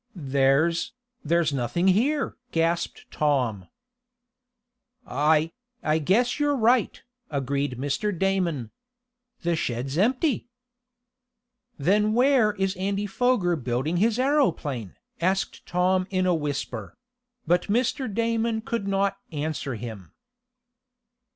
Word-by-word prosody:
"There's 140 +2 +1 0.3
there's 165 -1 +2
nothing 140 - +1
here!" 270 +10 +1 0.2
gasped 165 +1 -1
Tom. 125 -10 0 1.4
"I 155 +4 +2 0.3
I 155 +1 +2
guess 235 - +2
you're 290 -1 +2
right!" 240 -1 +2 0.3
agreed 140 -2 -2
Mr. 145 - -1
Damon 175 - 0 0.7
"The 170 0 +1
shed 120 -5 -2
is 140 +4 -3
empty!" 255 - +1 1.3
"Then 210 +8 +2
where 245 -3 +4
is 195 -1 -1
Andy 200 +2 -1
Foger 205 -4 +1
building 130 +4 -1
his 220 +4 +2
aeroplane?" 175 - 0 0.3
asked 190 +2 -1
Tom 185 +1 +1
in 185 -1 0
a 180 - +3
whisper; 145 - -4 0.5
but 175 +2 +2
Mr. 245 +3 0
Damon 230 +1 0
could 230 -2 -3
not 195 0 +1
answer 150 -3 -3
him. 105 -6 -8
175 Hz, 105 wpm, -25 LUFS, 145-215 Hz, 1.4 s, where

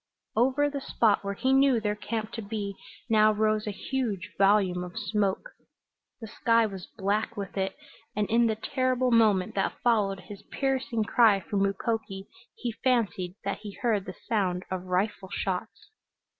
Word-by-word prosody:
Over 265 +5 +3
the 285 -1 -4
spot 220 -6 +2
where 200 0 -3
he 260 +5 +1
knew 270 -3 +5
their 210 -1 0
camp 215 +1 -4
to 225 - -5
be 205 -1 -4 0.3
now 215 -2 +5
rose 215 0 +1
a - - 0
huge 220 -4 -3
volume 195 -2 +3
of 180 +3 -8
smoke. 210 - -1 0.7
The 225 - -7
sky 230 +2 +2
was 195 -4 -6
black 205 +2 -1
with 200 -2 -5
it, 190 -1 -2 0.4
and 210 -1 0
in 235 +1 +3
the 220 - 0
terrible 255 +2 0
moment 215 -5 +4
that 195 - -1
followed 205 -5 +2
his 200 +1 -10
piercing 260 -4 -1
cry 215 -2 +4
for 200 - -4
Mukoki 195 0 -1 0.3
he 240 - -3
fancied 210 -8 +1
that 200 - -2
he 205 -1 -8
heard 215 -5 0
the 185 - -7
sound 185 -5 0
of 185 -1 -3
rifle 190 +1 -1
shots. 195 0 -4
210 Hz, 165 wpm, -28 LUFS, 195-230 Hz, 0.7 s, knew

